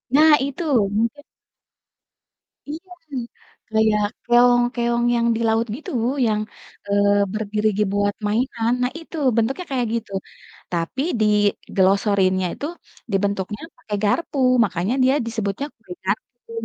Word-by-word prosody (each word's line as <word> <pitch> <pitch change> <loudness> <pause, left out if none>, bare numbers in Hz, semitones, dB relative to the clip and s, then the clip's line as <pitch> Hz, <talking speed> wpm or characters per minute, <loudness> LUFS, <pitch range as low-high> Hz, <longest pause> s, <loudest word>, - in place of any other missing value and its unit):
nah 310 +1 +7
itu, 280 +5 -4 0.3
mungkin 230 +6 -1 1.5
Iya, 335 +5 -7 0.8
kayak 220 -1 +2 0.2
keong 245 0 +5
keong 235 0 0
yang 235 0 +2
di - - -2
laut 225 +1 +2
gitu, 300 - -8 0.3
yang, 215 -1 +1 0.5
eee, 200 0 +3
berdiri 215 0 -1
gi 210 - +3
buat 205 0 +1
mainan. 230 +1 0
Nah, 250 - +1
itu 330 0 -11 0.2
bentuknya 265 +10 0
kayak 245 -3 0
gitu, 230 -3 -3 0.6
tapi 170 +10 -2 0.2
diglosorinnya 200 -2 +2
itu, 285 - -5 0.5
dibentuknya 200 +1 -1 0.2
pakai 210 - -5
garpu, 280 +7 0 0.3
makanya 185 +5 -1
dia 260 +1 +4
disebutnya 220 +3 -2
kue 205 -6 -10
garpu. 230 +4 -4
220 Hz, 120 wpm, -22 LUFS, 205-245 Hz, 1.5 s, nah